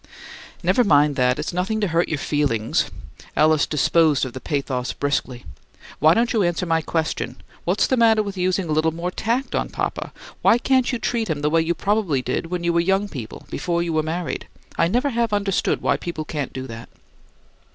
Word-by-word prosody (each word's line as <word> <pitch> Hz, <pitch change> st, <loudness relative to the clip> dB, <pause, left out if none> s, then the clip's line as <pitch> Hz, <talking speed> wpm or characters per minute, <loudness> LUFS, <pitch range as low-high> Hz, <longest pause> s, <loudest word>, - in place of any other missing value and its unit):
"Never 245 Hz, -, +3 dB
mind 150 Hz, -6 st, +4 dB
that; 125 Hz, -1 st, +3 dB
it's 150 Hz, +3 st, -3 dB
nothing 190 Hz, +5 st, -1 dB
to 205 Hz, -, +1 dB
hurt 165 Hz, +2 st, +1 dB
your 155 Hz, -, -1 dB
feelings." 135 Hz, -7 st, 0 dB, 0.5 s
Alice 155 Hz, -1 st, +4 dB
disposed 150 Hz, -1 st, +3 dB
of 125 Hz, -, -7 dB
the 130 Hz, -, -6 dB
pathos 135 Hz, -4 st, -2 dB
briskly. 135 Hz, -3 st, -2 dB, 0.5 s
"Why 155 Hz, +2 st, +5 dB
don't 235 Hz, +2 st, +2 dB
you 220 Hz, -, +2 dB
answer 175 Hz, 0 st, 0 dB
my 165 Hz, -1 st, +1 dB
question? 160 Hz, 0 st, -2 dB, 0.3 s
What's -, -, +2 dB
the 260 Hz, -, +1 dB
matter 225 Hz, -2 st, +4 dB
with 200 Hz, -1 st, -5 dB
using 185 Hz, 0 st, 0 dB
a -, -, -3 dB
little 155 Hz, +1 st, +2 dB
more 170 Hz, +3 st, -4 dB
tact 235 Hz, +8 st, -1 dB
on -, -, -1 dB
papa? -, -, -3 dB, 0.3 s
Why -, -, +5 dB
can't 260 Hz, +1 st, +2 dB
you 245 Hz, -, -1 dB
treat 230 Hz, -1 st, -1 dB
him 150 Hz, -2 st, -1 dB
the 150 Hz, +1 st, +1 dB
way 165 Hz, 0 st, +4 dB
you 170 Hz, +1 st, 0 dB
probably 190 Hz, -9 st, 0 dB
did 125 Hz, +6 st, -2 dB
when 175 Hz, 0 st, -3 dB
you 170 Hz, 0 st, +1 dB
were 170 Hz, -, +3 dB
young 195 Hz, +4 st, +1 dB
people, 120 Hz, -, -8 dB
before 170 Hz, -1 st, -1 dB
you 170 Hz, -1 st, -2 dB
were 155 Hz, -, +2 dB
married? 160 Hz, -2 st, -3 dB, 0.3 s
I 165 Hz, -, +3 dB
never 250 Hz, +9 st, +1 dB
have 235 Hz, -2 st, 0 dB
understood 200 Hz, -2 st, 0 dB
why -, -, +2 dB
people 165 Hz, -3 st, -5 dB
can't 145 Hz, -3 st, -4 dB
do 130 Hz, 0 st, -6 dB
that." 115 Hz, -2 st, -9 dB
165 Hz, 205 wpm, -22 LUFS, 145-200 Hz, 0.5 s, Why